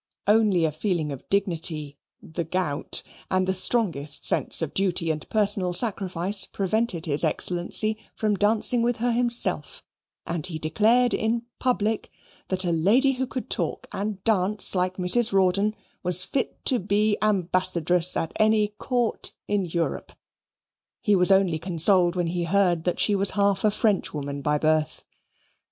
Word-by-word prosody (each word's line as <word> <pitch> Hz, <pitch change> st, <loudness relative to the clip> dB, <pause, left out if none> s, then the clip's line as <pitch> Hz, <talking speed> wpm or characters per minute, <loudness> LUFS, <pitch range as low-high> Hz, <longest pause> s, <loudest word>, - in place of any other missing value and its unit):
Only 205 Hz, -5 st, +3 dB
a 155 Hz, -, -1 dB
feeling 155 Hz, -2 st, -2 dB
of 135 Hz, -, -10 dB
dignity, 165 Hz, -6 st, -1 dB, 0.3 s
the 170 Hz, +2 st, -5 dB
gout, 160 Hz, -3 st, -1 dB, 0.3 s
and 185 Hz, 0 st, +1 dB
the 190 Hz, -, +1 dB
strongest 185 Hz, -, 0 dB
sense -, -, +1 dB
of 155 Hz, -, -5 dB
duty 180 Hz, -4 st, 0 dB
and 155 Hz, -1 st, -6 dB
personal 200 Hz, -4 st, +1 dB
sacrifice 190 Hz, -2 st, +2 dB
prevented 195 Hz, -3 st, -2 dB
his 150 Hz, -1 st, -1 dB
Excellency 180 Hz, +6 st, -1 dB, 0.2 s
from 215 Hz, -1 st, -1 dB
dancing 215 Hz, +4 st, +3 dB
with 240 Hz, +1 st, 0 dB
her 240 Hz, +2 st, -1 dB
himself, 240 Hz, 0 st, +1 dB, 0.4 s
and 170 Hz, 0 st, -4 dB
he 165 Hz, -3 st, -6 dB
declared 220 Hz, +11 st, +2 dB
in 230 Hz, +1 st, -1 dB, 0.2 s
public 220 Hz, -4 st, -1 dB, 0.4 s
that 185 Hz, 0 st, 0 dB
a 175 Hz, -, 0 dB
lady 210 Hz, -, +3 dB
who 260 Hz, 0 st, -3 dB
could 255 Hz, 0 st, -6 dB
talk -, -, -3 dB
and 200 Hz, -1 st, -5 dB
dance 205 Hz, -2 st, +3 dB
like 185 Hz, 0 st, -1 dB
Mrs. 215 Hz, +6 st, +2 dB
Rawdon 195 Hz, +3 st, +1 dB, 0.3 s
was 180 Hz, +1 st, +3 dB
fit 265 Hz, -, -4 dB
to 255 Hz, -, +2 dB
be 205 Hz, +2 st, +1 dB
ambassadress 180 Hz, -3 st, +1 dB
at 165 Hz, -, -3 dB
any 215 Hz, -1 st, +2 dB
court 245 Hz, -4 st, -2 dB
in 205 Hz, -2 st, -1 dB
Europe. 170 Hz, 0 st, -4 dB, 0.9 s
He 210 Hz, -3 st, +1 dB
was 180 Hz, +1 st, +3 dB
only 190 Hz, -4 st, +2 dB
consoled 175 Hz, +1 st, +2 dB
when 175 Hz, -1 st, -1 dB
he 170 Hz, +1 st, -2 dB
heard 175 Hz, -2 st, +1 dB
that 180 Hz, -, -1 dB
she 210 Hz, -, +3 dB
was 200 Hz, -1 st, +4 dB
half 200 Hz, -1 st, +1 dB
a 215 Hz, -, +4 dB
Frenchwoman 150 Hz, -, -2 dB
by 150 Hz, +1 st, 0 dB
birth. 155 Hz, 0 st, -1 dB
190 Hz, 150 wpm, -24 LUFS, 170-215 Hz, 0.9 s, was